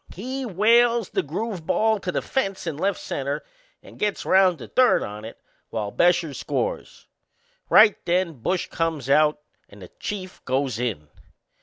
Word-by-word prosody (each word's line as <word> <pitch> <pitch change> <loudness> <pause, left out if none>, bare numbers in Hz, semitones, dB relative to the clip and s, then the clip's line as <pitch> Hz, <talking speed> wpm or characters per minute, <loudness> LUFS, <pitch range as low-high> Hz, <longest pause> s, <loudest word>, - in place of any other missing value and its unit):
He 255 +6 -4
whales 230 +2 +3
the - - 0
groove 175 +2 -5
ball 220 -1 +2
to 185 - -3
the - - -2
fence 195 -9 -2
in 165 -3 -3
left 195 +5 -1
center 140 +2 -3 0.4
and - - -15
gets 210 -1 -1
round 185 -2 +4
to - - -10
third 255 -1 +3
on 105 +1 -7
it, 115 - -9 0.3
while 105 -3 -3
Bescher 175 -1 +2
scores. - - -4 0.6
Right 215 -1 +6
then 170 -6 0
Bush 180 +8 0
comes 160 -5 -2
out 150 +1 +3 0.3
and 100 -2 -14
the 90 - -12
Chief 185 -3 -6
goes 130 -3 -1
in. 105 -12 -3
175 Hz, 160 wpm, -24 LUFS, 140-210 Hz, 0.6 s, Right